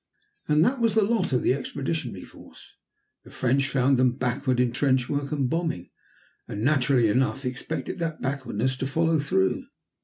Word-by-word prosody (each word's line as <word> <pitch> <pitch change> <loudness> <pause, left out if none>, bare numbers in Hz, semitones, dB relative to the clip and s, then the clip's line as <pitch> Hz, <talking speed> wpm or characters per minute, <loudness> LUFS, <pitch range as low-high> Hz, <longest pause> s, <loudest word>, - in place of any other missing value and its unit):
And 150 +2 +4
that 260 +1 +1
was 230 -3 +2
the 220 - +5
lot 205 -5 0
of 125 - +1
the - - +3
Expeditionary 135 - -4
Force. - - -16 0.5
The - - -15
French 135 +2 0
found 135 0 +2
them 125 -1 +3
backward 125 0 0
in 125 -1 +2
trench 130 0 +1
work 145 0 -2
and 140 -4 0
bombing, 160 - -2 0.6
and 105 - -5
naturally 130 -3 +3
enough 130 +4 0
expected 125 +8 -4
that 165 -2 -3
backwardness 130 -2 -2
to 135 - -2
follow 160 +3 +1
through. 95 -10 0
135 Hz, 165 wpm, -26 LUFS, 125-155 Hz, 0.6 s, the